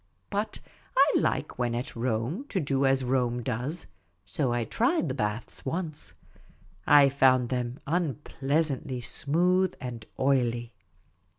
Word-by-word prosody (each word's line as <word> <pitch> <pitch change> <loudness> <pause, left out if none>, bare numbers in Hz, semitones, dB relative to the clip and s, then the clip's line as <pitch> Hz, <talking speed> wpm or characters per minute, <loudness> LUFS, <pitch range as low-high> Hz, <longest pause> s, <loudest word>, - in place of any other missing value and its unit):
But - - -2 0.4
I - - +6
like - - -1
when 120 -1 0
at 125 +3 -4
Rome 125 - -2
to 195 - 0
do 140 -3 +1
as 135 0 +2
Rome 125 -1 0
does; 130 +10 -3 0.4
so 120 +5 -1
I 120 0 0
tried 235 - +1
the - - -1
baths 105 -2 -3
once. 160 +1 -4 0.7
I 145 -1 +8
found 130 -3 +4
them 125 0 -2
unpleasantly 140 -4 -1
smooth 180 +9 +2
and 120 -3 -6 0.2
oily. 120 -3 +1
130 Hz, 125 wpm, -28 LUFS, 120-150 Hz, 0.7 s, I